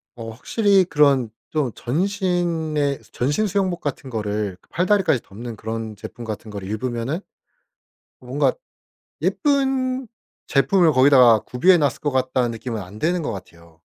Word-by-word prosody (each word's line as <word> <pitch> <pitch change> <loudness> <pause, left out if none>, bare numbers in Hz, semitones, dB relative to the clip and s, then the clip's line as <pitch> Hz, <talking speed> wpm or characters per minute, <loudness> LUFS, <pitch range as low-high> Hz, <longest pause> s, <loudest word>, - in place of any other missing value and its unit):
어 115 -1 -7
확실히 195 - +2
그런 140 -7 +3 0.2
좀 150 -6 -1
전신에 165 - -1
전신 145 - 0
수영복 190 -3 -1
같은 140 -2 -4
거를 105 -3 -2
팔다리까지 185 - +2
덮는 115 +4 -8
그런 110 0 -5
제품 110 +3 -9
같은 110 0 -6
거를 100 -2 -6
입으면은 120 - -2 1.0
뭔가 - - +1 0.7
예쁜 265 -3 +1 0.4
제품을 160 +4 +4
거기다가 130 -4 +6
구비해 175 +8 +3
놨을 145 -4 0
것 145 - -1
같다는 130 -2 0
느낌은 115 -1 -5
안 95 +4 -11
드는 175 +4 0
것 145 - -2
같아요. 85 -4 -12
130 Hz, 295 characters per minute, -22 LUFS, 115-175 Hz, 1.0 s, 거기다가